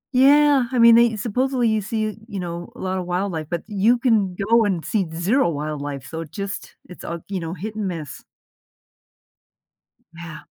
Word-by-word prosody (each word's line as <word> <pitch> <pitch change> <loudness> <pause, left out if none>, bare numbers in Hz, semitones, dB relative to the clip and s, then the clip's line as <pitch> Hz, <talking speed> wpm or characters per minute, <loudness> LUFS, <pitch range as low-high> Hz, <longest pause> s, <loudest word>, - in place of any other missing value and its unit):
Yeah. 280 0 +5
I 255 - -1
mean, 235 -1 +8
they 235 -1 +5
supposedly, 245 +3 0
you 220 -1 +1
see, 215 +1 -2
you 205 -4 -5
know, 170 -1 -6
a - - -13
lot 185 0 -2
of 180 - -5
wildlife, 180 -3 -2
but 170 -1 -3
you 215 +3 +2
can 220 -7 +1
go 225 +5 +3
and 190 -6 -1
see 200 -5 0
zero 180 +8 +1
wildlife, 145 -3 -4
so 160 +4 -5
just 195 +5 -7
it's, 180 - -12
uh, 170 - -4
you 195 -2 -2
know, 165 +1 -5
hit 210 +6 -6
and 210 -3 -2
miss. 160 -6 -6 1.9
Yeah. 165 -2 -9
195 Hz, 175 wpm, -22 LUFS, 170-230 Hz, 1.9 s, mean